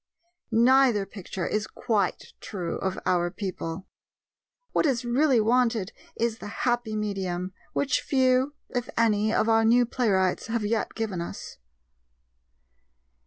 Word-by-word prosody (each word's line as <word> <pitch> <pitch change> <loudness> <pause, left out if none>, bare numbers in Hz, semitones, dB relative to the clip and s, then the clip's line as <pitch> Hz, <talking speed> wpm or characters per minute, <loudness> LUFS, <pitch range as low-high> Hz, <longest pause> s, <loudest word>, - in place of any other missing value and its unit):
Neither 240 -2 +4
picture 195 -2 -6
is 215 0 -1
quite 205 -5 -2
true 180 -5 -4
of 190 0 -2
our 175 -1 +2
people. 185 -2 -5 0.9
What - - +2
is 255 -3 0
really 255 +1 +3
wanted 230 -3 +2 0.2
is 230 -1 -1
the - - -7 0.2
happy 240 -3 0
medium, 190 -3 -3 0.2
which 275 -3 +1
few, 260 +1 +2
if 245 -2 -3
any, 215 -2 +3
of 220 - +2
our 225 0 +4
new 240 +2 +5
playwrights 195 -7 +1
have 225 -1 -1
yet 220 +2 -1
given 210 -6 -2
us. 170 - -7
225 Hz, 125 wpm, -26 LUFS, 195-245 Hz, 0.9 s, new